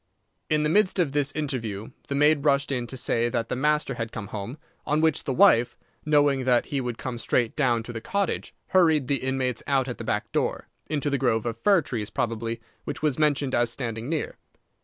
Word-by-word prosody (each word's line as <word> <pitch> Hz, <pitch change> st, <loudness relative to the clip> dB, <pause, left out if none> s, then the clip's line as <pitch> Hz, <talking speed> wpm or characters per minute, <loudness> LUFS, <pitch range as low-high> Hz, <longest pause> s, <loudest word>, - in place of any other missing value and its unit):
In 150 Hz, 0 st, +2 dB
the 150 Hz, -, +1 dB
midst 200 Hz, +3 st, +3 dB
of 170 Hz, -6 st, +2 dB
this 145 Hz, 0 st, +1 dB
interview 115 Hz, -8 st, -4 dB, 0.2 s
the 140 Hz, -, -2 dB
maid 150 Hz, 0 st, +4 dB
rushed 140 Hz, -1 st, +2 dB
in 125 Hz, -3 st, -2 dB
to 130 Hz, -, -6 dB
say 120 Hz, -1 st, +1 dB
that 115 Hz, 0 st, -2 dB
the -, -, -1 dB
master 150 Hz, +1 st, +1 dB
had 115 Hz, -2 st, -4 dB
come 105 Hz, -3 st, -6 dB
home, 110 Hz, +5 st, -6 dB, 0.3 s
on 150 Hz, +1 st, +1 dB
which 160 Hz, -2 st, +2 dB
the -, -, -1 dB
wife, 120 Hz, -1 st, +4 dB, 0.3 s
knowing 145 Hz, -3 st, +3 dB
that 125 Hz, -2 st, +3 dB
he 140 Hz, -2 st, -2 dB
would 120 Hz, -2 st, -4 dB
come 125 Hz, -2 st, -5 dB
straight 115 Hz, +1 st, 0 dB
down 120 Hz, -6 st, +1 dB
to 120 Hz, -, -8 dB
the 115 Hz, -, -5 dB
cottage, 200 Hz, -, -2 dB, 0.2 s
hurried 160 Hz, -6 st, +4 dB
the 140 Hz, -, +2 dB
inmates 130 Hz, -2 st, -1 dB
out 135 Hz, -2 st, +2 dB
at 125 Hz, -, -5 dB
the -, -, -5 dB
back -, -, -2 dB
door, -, -, -1 dB, 0.2 s
into 145 Hz, -1 st, -1 dB
the 140 Hz, -, 0 dB
grove 115 Hz, -4 st, +1 dB
of 115 Hz, -1 st, -3 dB
fir 195 Hz, -, +4 dB
trees, 110 Hz, -6 st, -4 dB
probably, 115 Hz, 0 st, -2 dB, 0.2 s
which -, -, -6 dB
was 150 Hz, -3 st, +1 dB
mentioned 145 Hz, -3 st, +1 dB
as 120 Hz, 0 st, +3 dB
standing 115 Hz, 0 st, -4 dB
near. 160 Hz, -2 st, -2 dB
130 Hz, 215 wpm, -26 LUFS, 120-150 Hz, 0.3 s, maid